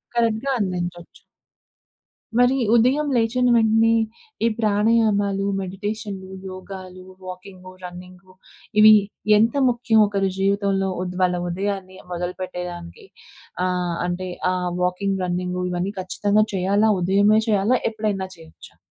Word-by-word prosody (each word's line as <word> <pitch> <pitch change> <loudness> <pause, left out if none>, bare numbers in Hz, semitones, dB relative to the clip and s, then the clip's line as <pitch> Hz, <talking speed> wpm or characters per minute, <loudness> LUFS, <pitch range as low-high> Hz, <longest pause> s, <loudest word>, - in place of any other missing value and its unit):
కరెక్ట్‌గా 230 +3 +1
అందించొచ్చు. 175 -3 -4 1.2
మరి 245 +2 +4 0.2
ఉదయం 260 +6 +3
లేచిన 245 +2 +2
వెంటనే 225 0 +4 0.5
ఈ - - +5
ప్రాణాయామాలు, 210 -2 +2 0.2
మెడిటేషన్‌లు, 195 0 -5 0.2
యోగాలు, 185 -1 -9 0.2
వాకింగు, 185 0 -10
రన్నింగు 180 +1 -11 0.5
ఇవి 215 0 +9 0.4
ఎంత 225 +2 +3 0.2
ముఖ్యం 235 -2 +2
ఒకరి 195 -1 0
జీవితంలో 195 0 +1
ఉద్ 180 0 -5
వాళ్ళ 180 -1 +2
ఉదయాన్ని 190 0 -4
మొదలుపెట్టేదానికి? 180 - -6 0.6
ఆహ్! 180 -2 -1
అంటే 180 +1 -3 0.2
ఆహ్, 180 -1 -2
వాకింగ్, 190 +2 -1
రన్నింగూ, 180 0 -2
ఇవన్నీ 180 +3 -2
ఖచ్చితంగా 205 +3 +1
చేయాలా? 200 +4 +2
ఉదయమే 200 +4 +4
చేయాలా? 210 +5 +3
ఎప్పుడైనా 210 -3 -2
చేయొచ్చా? 160 - -15
195 Hz, 105 wpm, -22 LUFS, 180-215 Hz, 1.2 s, ఇవి